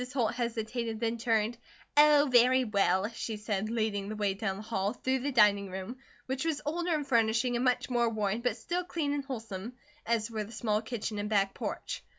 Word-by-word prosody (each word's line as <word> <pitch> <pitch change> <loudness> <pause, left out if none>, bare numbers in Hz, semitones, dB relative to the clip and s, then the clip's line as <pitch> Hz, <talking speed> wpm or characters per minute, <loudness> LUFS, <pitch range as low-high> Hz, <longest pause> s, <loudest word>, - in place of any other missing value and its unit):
Holt 240 -4 +1
hesitated, 235 -1 -3
then 230 0 -1
turned: 225 0 +1 0.4
"Oh, 295 0 +6
very 250 +1 +5
well," 200 -3 +2
she 230 -1 -5
said, 210 0 -2
leading 215 -3 -1
the 215 - -4
way 205 -2 0
down 195 -1 -3
the 210 - -8
hall, 205 -2 -1
through 260 +1 -1
the 285 +3 -2
dining 205 -5 +4
room, 190 +6 -6 0.3
which 265 +2 -2
was 320 -3 0
older 340 +2 0
in 300 - -1
furnishing 235 -1 +2
and 240 - 0
much 250 -1 +1
more 240 -2 +2
worn, 215 0 -1
but 245 -2 0
still 350 +10 -2
clean 320 -5 -2
and 285 -1 -2
wholesome, 225 -4 -6 0.3
as 230 -1 0
were 215 -1 -2
the 210 - -11
small 215 -2 0
kitchen 220 -2 -4
and 205 +1 -3
back 195 -2 +2
porch. - - -4
230 Hz, 200 wpm, -30 LUFS, 210-255 Hz, 0.4 s, Oh